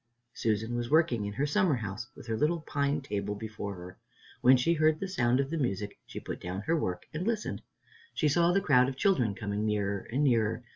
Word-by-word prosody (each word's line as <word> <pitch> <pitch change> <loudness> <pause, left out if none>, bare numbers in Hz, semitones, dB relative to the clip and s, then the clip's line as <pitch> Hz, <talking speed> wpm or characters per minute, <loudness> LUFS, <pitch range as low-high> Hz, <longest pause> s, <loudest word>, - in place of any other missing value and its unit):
Susan 110 +1 -1
was 120 0 -2
working 140 -9 +3
in 100 - -5
her 135 +7 0
summer 175 0 +2
house, 110 0 -5
with - - -12
her 115 -1 -2
little 155 +8 +1
pine 145 -1 -1
table 105 -5 -3
before 105 -1 -6
her. 90 0 -11 0.4
When 130 +1 +7
she 145 +7 +2
heard 155 -1 +3
the 195 - -3
sound 125 -9 +1
of 140 +1 -1
the 165 - -1
music, 105 -6 -2
she - - -6
put - - -7
down 90 +2 -4
her 165 +11 +1
work 90 - -2
and 170 +6 -3
listened. 225 -2 -2 0.5
She 155 - +2
saw 170 +4 +3
the 195 +2 +2
crowd 130 -8 +4
of 130 - -7
children 125 - +2
coming 105 0 -3
nearer 100 -2 -1
and 135 +5 +1
nearer. 115 -3 +2
125 Hz, 220 wpm, -30 LUFS, 105-155 Hz, 0.5 s, When